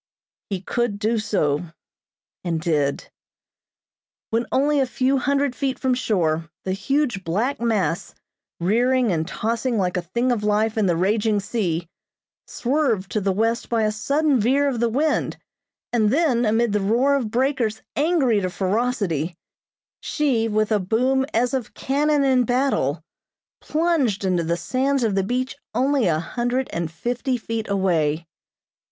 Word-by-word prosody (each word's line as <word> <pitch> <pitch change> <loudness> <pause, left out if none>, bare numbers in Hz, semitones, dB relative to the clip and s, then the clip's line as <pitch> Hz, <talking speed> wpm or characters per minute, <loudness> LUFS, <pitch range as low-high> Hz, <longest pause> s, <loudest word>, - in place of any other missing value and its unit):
He 195 -3 -3
could 240 +1 -1
do 220 +2 0
so, 155 -8 0 0.8
and 170 -3 -1
did. 150 -4 -1 1.2
When 230 +1 0
only 290 +2 +2
a 265 - +2
few 260 +2 +1
hundred 280 -1 0
feet 270 -1 -1
from 260 -1 +1
shore, 165 -10 0 0.2
the 190 - -1
huge 240 +2 0
black 220 +11 -1
mass, 195 -9 -1 0.4
rearing 240 +6 +2
and 160 -2 -1
tossing 230 +4 -1
like 180 -2 0
a - - 0
thing 235 +9 -1
of 225 -4 -1
life 210 +1 +1
in 215 -3 +2
the 175 - +2
raging 210 +4 +1
sea, 180 -6 -2 0.6
swerved 240 -7 0
to 215 - 0
the 195 0 +1
west 225 +4 0
by 230 -2 +1
a 215 - +2
sudden 280 +6 +1
veer 270 +6 +2
of 255 -4 -1
the 235 0 +2
wind, 295 +6 0 0.6
and 220 -3 +3
then, 265 -5 +2
amid 225 0 +2
the 210 - +1
roar 240 +8 +2
of 260 -6 0
breakers 245 -2 0
angry 285 - +2
to 185 - -1
ferocity, 185 - -1 0.6
she, 260 -7 0
with 215 0 0
a 210 - +3
boom 255 +7 +1
as 240 +3 +1
of 260 -4 -3
cannon 290 +1 +1
in 260 -2 +3
battle, 245 - 0 0.6
plunged 300 - 0
into 180 -2 +1
the 170 +1 -1
sands 265 +7 0
of 220 -3 +1
the 195 - +2
beach 250 +6 -2 0.2
only 265 -2 +2
a 160 -3 +2
hundred 245 +8 -2
and 170 -1 -2
fifty 245 - -2
feet 225 -1 -4
away. 170 -5 +1
225 Hz, 155 wpm, -22 LUFS, 190-260 Hz, 1.2 s, and